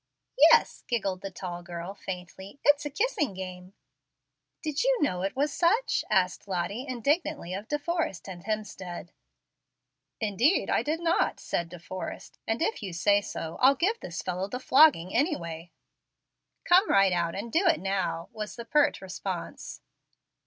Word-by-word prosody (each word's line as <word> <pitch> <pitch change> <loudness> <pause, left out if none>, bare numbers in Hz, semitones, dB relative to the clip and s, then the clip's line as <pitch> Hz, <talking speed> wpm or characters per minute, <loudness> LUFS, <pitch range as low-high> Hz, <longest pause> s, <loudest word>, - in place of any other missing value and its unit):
"Yes," 470 - +4
giggled 195 -6 -1
the 195 - -5
tall 175 -2 -6
girl, 175 +2 -6
faintly; 190 +4 -8
"it's 290 0 +4
a - - -5
kissing 300 - 0
game." 185 0 -8 0.9
"Did 305 +2 -1
you - - +3
know 180 - 0
it 195 +1 -2
was 285 +2 0
such?" 435 +9 +2
asked 185 +1 +1
Lottie, 195 +8 -2
indignantly, 285 - -1
of 200 +3 -5
De 295 - 0
Forrest 325 - -2
and 175 -3 -8
Hemstead. 190 -5 -5 1.1
"Indeed 225 - +2
I - - +3
did 315 +3 -2
not," 340 0 +1
said 170 -1 -2
De 175 - -9
Forrest; 185 +2 -7
"and 225 +7 0
if 440 - -1
you 190 -4 -5
say 200 +4 +3
so 165 -4 -6
I'll 265 +2 +7
give 410 +10 +1
this 170 -1 -6
fellow 185 +1 -2
the 250 +5 -5
flogging, 260 - +5
anyway." 170 - -1 0.9
"Come 370 +4 +5
right 195 -2 +5
out, 170 -1 0
and 225 +4 -5
do 355 +4 +3
it 330 -2 +4
now," 190 -3 -2
was 215 -1 -6
the 235 - -7
pert 290 0 +2
response. 190 0 -6
205 Hz, 160 wpm, -28 LUFS, 180-295 Hz, 1.1 s, I'll